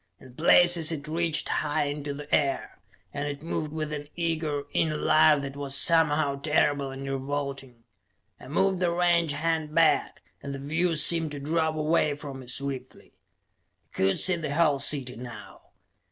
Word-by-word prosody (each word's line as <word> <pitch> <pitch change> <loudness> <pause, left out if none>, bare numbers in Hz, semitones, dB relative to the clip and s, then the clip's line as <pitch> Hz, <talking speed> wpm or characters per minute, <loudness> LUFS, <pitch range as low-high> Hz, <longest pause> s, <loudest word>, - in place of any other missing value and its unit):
In 130 -1 -15
places 170 +2 +4
it 150 -2 -5
reached 165 0 -1
high 150 -1 0
into 145 0 -4
the 145 +1 -8
air, 140 -2 0 0.3
and 145 +1 -3
it 145 0 -6
moved 155 -2 -3
with 155 -1 -4
an 145 -1 -6
eager, 160 -4 -2
inner 155 -2 0
life 150 -1 +4
that 135 0 -6
was 140 -1 +1
somehow 155 -4 +3
terrible 145 -2 +1
and 135 +1 -7
revolting. 135 -2 -5 0.6
I - - -12
moved 190 +6 +1
the 180 -2 +1
range 170 -2 +2
hand 160 0 -2
back, 165 -1 +2 0.2
and 140 -1 -6
the - - -5
view 160 +5 -1
seemed 160 +1 +3
to 145 - -6
drop 160 +2 -1
away 155 -1 +1
from 140 -2 -8
me 130 - -12
swiftly. 135 +1 -4 0.8
I - - -20
could 95 0 +1
see 185 -2 +2
the 155 -4 -4
whole 150 -4 +3
city 135 -3 -1
now. 120 0 -10
150 Hz, 170 wpm, -27 LUFS, 140-160 Hz, 0.8 s, places